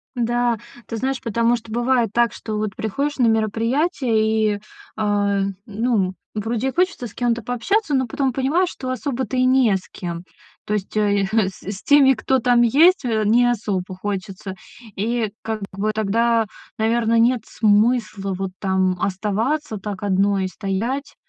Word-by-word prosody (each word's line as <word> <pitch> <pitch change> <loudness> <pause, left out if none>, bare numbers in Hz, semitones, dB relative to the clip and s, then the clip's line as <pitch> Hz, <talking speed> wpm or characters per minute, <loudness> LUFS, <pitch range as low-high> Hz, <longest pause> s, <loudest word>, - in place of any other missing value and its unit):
Да. 240 0 +1 0.3
Ты 230 - -4
знаешь, 265 +2 -2
потому 230 +1 +1
что 225 -1 -9
бывает 240 0 +1
так, 235 -1 +2
что 215 -1 -5
вот 210 -2 -3
приходишь 280 +9 -2
на 245 -3 +3
мероприятие 225 - +1
и, - - -7 0.4
а, 205 -2 +1 0.2
ну, 210 -3 0 0.2
вроде 225 +4 -1
и - - -7
хочется 350 -8 0
с 210 - -15
кем-то 240 -1 -1
пообщаться, 295 - 0
но 260 -2 +2
потом 270 +1 -1
понимаешь, 295 +8 +1
что 255 - -6
особо-то 255 0 -2
и 255 - +3
не 255 -5 +4
с 190 - -5
кем. 170 -1 -6 0.4
То 210 - -2
есть, 205 0 -5
э, 205 -1 +2
е - - +1
х 220 +3 +2
с 190 - -15
с 200 0 -6
теми, 280 -2 +6
кто 265 +3 +1
там 245 0 +3
есть, 310 +11 +5
э, 220 -3 0
не 245 +3 +4
особо 195 -5 -2
хочется. 195 0 -5 0.4
И 225 +1 -1
как 220 -1 -4
бы 200 +3 -1
тогда, 225 +2 +2 0.3
наверно, 230 +1 +2
нет 235 +1 +3
смысла 215 -2 +1
вот 195 -1 -3
там 190 -1 +1
оставаться 215 +7 -1
так 200 0 -6
одной 195 -1 +2
стоять. 220 +9 -3
225 Hz, 165 wpm, -21 LUFS, 205-250 Hz, 0.4 s, теми